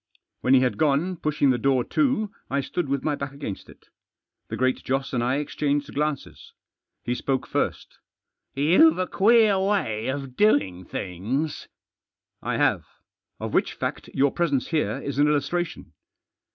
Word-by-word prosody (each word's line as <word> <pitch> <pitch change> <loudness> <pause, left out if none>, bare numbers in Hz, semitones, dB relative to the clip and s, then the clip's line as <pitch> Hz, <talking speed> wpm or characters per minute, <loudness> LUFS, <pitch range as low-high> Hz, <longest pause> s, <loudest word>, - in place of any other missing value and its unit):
When 130 +1 +4
he 130 - +5
had 125 -1 0
gone, 155 +4 +2
pushing 150 -4 +1
the 125 - 0
door 130 -1 +2
to 255 - 0 0.2
I 140 - 0
stood 150 +3 -3
with 140 -1 -1
my 155 - 0
back 140 -1 -5
against 140 -9 -7
it. - - -18 0.6
The - - -4
Great 130 0 0
Joss 135 +1 -2
and 120 -2 0
I 125 +2 +1
exchanged 145 0 -1
glances. 150 -1 -3 0.5
Jle 120 - 0
spoke 130 0 -1
first, - - -3 0.3
" - - -54
You've 175 - +5
a 185 - 0
queer 215 0 +4
way 190 - 0
of 135 -1 -4
doing 95 - +2
things." 110 - -3 0.4
" - - -62
I - - -1
have. - - +2 0.6
Of - - -5
which - - +1
fact - - -4
your 140 0 +2
presence 145 -7 0
here 160 -3 0
is 140 0 -3
an 145 - +5
illustration." 155 +4 -2
140 Hz, 165 wpm, -25 LUFS, 130-170 Hz, 0.6 s, he